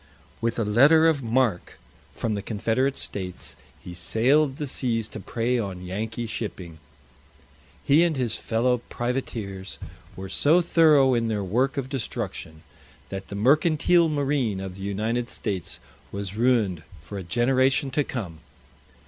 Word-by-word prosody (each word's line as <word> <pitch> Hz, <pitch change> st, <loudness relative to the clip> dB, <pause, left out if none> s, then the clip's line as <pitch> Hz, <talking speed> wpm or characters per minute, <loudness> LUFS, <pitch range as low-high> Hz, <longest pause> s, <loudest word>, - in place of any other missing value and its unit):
With 115 Hz, 0 st, -1 dB
a 115 Hz, -, 0 dB
letter 145 Hz, +10 st, +6 dB
of 155 Hz, -4 st, +2 dB
marque 115 Hz, -6 st, 0 dB, 0.4 s
from 115 Hz, -, -2 dB
the 100 Hz, -, -2 dB
Confederate 115 Hz, +6 st, 0 dB
States, 90 Hz, -3 st, -4 dB, 0.3 s
he 90 Hz, -, -8 dB
sailed 130 Hz, -, +2 dB
the 150 Hz, 0 st, -4 dB
seas 115 Hz, -5 st, -1 dB
to -, -, -7 dB
prey 120 Hz, +5 st, -1 dB
on 95 Hz, -4 st, -5 dB
Yankee 110 Hz, +5 st, -4 dB
shipping. 90 Hz, -7 st, -6 dB, 1.0 s
He 150 Hz, +4 st, +5 dB
and 165 Hz, -4 st, +1 dB
his 120 Hz, -4 st, 0 dB
fellow 125 Hz, +2 st, +1 dB
privateers 110 Hz, -6 st, -4 dB, 0.4 s
were 95 Hz, +1 st, -7 dB
so 150 Hz, -, +3 dB
thorough 155 Hz, -6 st, +5 dB
in 115 Hz, -1 st, +1 dB
their 105 Hz, -2 st, -1 dB
work 130 Hz, -, 0 dB
of 135 Hz, -2 st, -2 dB
destruction, 105 Hz, -, -5 dB, 0.5 s
that 95 Hz, 0 st, -6 dB
the 100 Hz, -, -7 dB
Mercantile 155 Hz, -, +3 dB
Marine 140 Hz, -8 st, 0 dB
of 95 Hz, -1 st, -5 dB
the 95 Hz, -, -11 dB
United 110 Hz, +5 st, -2 dB
States 95 Hz, -6 st, -4 dB, 0.3 s
was 100 Hz, -1 st, -5 dB
ruined 110 Hz, -8 st, +2 dB, 0.2 s
for 100 Hz, +6 st, -8 dB
a -, -, -6 dB
generation 130 Hz, -, +2 dB
to 145 Hz, +2 st, +1 dB
come. 95 Hz, -, -6 dB
115 Hz, 145 wpm, -25 LUFS, 100-135 Hz, 1.0 s, letter